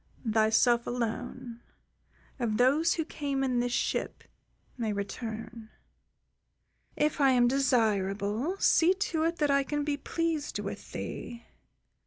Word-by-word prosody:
"Thyself 220 +2 +3
alone, 240 0 -4 0.8
of 225 -3 0
those 285 +7 +3
who 320 - -2
came 280 -3 -2
in 255 -2 +1
this 245 0 0
ship, - - -2 0.5
may 230 -4 -2
return. 220 +2 -6 1.3
If 300 0 0
I 275 - +6
am 245 -1 +4
desirable, 220 - +1
see 360 -1 +4
to 365 -5 -1
it 335 +1 0
that 295 -3 +1
I 280 0 +4
can 295 +2 -2
be 290 -1 -1
pleased 325 +1 -2
with - - -6
thee." 235 -1 -6
250 Hz, 125 wpm, -29 LUFS, 225-295 Hz, 1.3 s, I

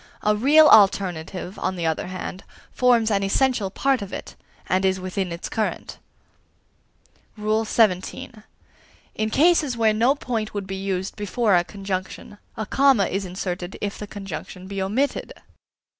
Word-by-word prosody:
A 210 0 +3
real 295 +8 +6
alternative, 190 - +3
on 185 - -2
the 170 -2 -3
other 160 +1 -1
hand, 185 0 -6 0.3
forms 235 -3 +3
an 200 -1 +2
essential 210 +1 +1
part 270 +4 0
of 200 -1 -7
it, - - -7 0.3
and 185 +1 +1
is 190 0 +1
within 185 0 -3
its 170 +1 -5
current. 220 -1 -3 1.4
XVII. 215 -3 +1 0.8
In 215 0 -1
cases 300 -2 +3
where 220 -2 +3
no 240 +6 +3
point 225 -6 -4
would 200 -1 -3
be 195 0 -5
used 190 -1 -3
before 210 0 +1
a 175 - +3
conjunction, 195 +1 -6 0.2
a 220 - -3
comma 265 -3 +3
is 195 +1 -2
inserted 180 0 -5
if 205 -1 -4
the 210 - -6
conjunction 190 -2 -8
be 195 0 -4
omitted. 235 +9 -1
200 Hz, 145 wpm, -23 LUFS, 185-225 Hz, 1.4 s, real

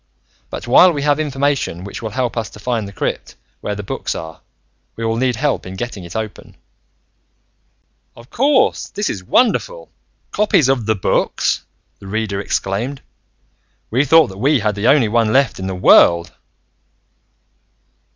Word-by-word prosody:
But - - -7
while 175 +9 +6
we 145 -4 -3
have 145 0 +2
information 140 - -1
which 100 +5 -8
will 110 - -4
help 125 +2 -2
us 115 -2 -3
to - - -14
find 115 -2 -2
the - - -9
crypt 95 - -4 0.2
where 105 - -4
the 105 - -6
books 95 - -4
are, 80 -1 -8 0.5
we 115 - -4
will 115 0 0
need 125 +1 0
help 140 +4 -1
in 95 0 -8
getting 115 -3 -6
it 85 - -10
open." 110 -2 -6 1.6
"Of 115 +1 -16
course! 270 +1 +2
This 205 0 -3
is 95 - -7
wonderful. 255 - 0 0.4
Copies 185 -10 +2
of 125 -5 0
The 110 - +2
Books!" 95 - 0 0.3
the 100 - -12
Reader 105 -1 -2
exclaimed. 105 +7 -3 0.9
"We 130 +5 +2
thought 160 0 +5
that 95 0 -11
we 140 +4 +3
had 105 0 0
the 100 +2 -1
only 135 -4 +4
one 115 0 +1
left 135 -3 +2
in 95 - -4
the 95 - -3
world!" 85 -2 +5
115 Hz, 160 wpm, -18 LUFS, 100-140 Hz, 1.6 s, while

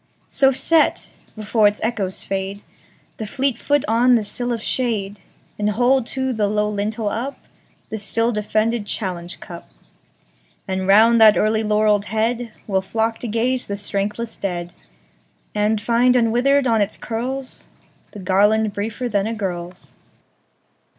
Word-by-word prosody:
So 270 -1 +4
set, 315 +4 +1 0.2
before 215 0 +2
its 205 +1 -1
echoes 210 -5 -2
fade, 195 +1 -4 0.5
The 220 - -5
fleet 265 +1 -1
foot 290 -1 +1
on 240 +3 +4
the 225 - +1
sill 245 +4 -2
of 230 -2 -3
shade, 210 -5 -1 0.4
And 210 0 +1
hold 245 +3 +2
to 265 -1 -1
the 215 -3 0
low 210 +1 0
lintel 210 +1 -2
upThe 230 -2 -8
still 230 +3 0
defended 215 0 -1
challenge 180 -5 -4
cup. - - -10 1.0
And 190 -1 -2
round 225 +4 +6
that 215 -4 +7
early 215 +2 +2
laurelled 210 -1 +2
headWill 220 -3 -2
flock 225 +3 -1
to 245 - -5
gaze 245 +3 0
the 200 - -3
strengthless 205 +3 -3
dead, 175 -3 -4 0.8
And 210 +1 +1
find 240 +3 +3
unwithered 250 +4 +3
on 225 -3 +2
its 205 +1 -1
curlsThe 245 -3 -7
garland 205 +3 +3
briefer 220 +5 -3
than 205 -3 0
a 230 - -3
girl's. 180 -4 -6
220 Hz, 135 wpm, -21 LUFS, 205-235 Hz, 1.0 s, that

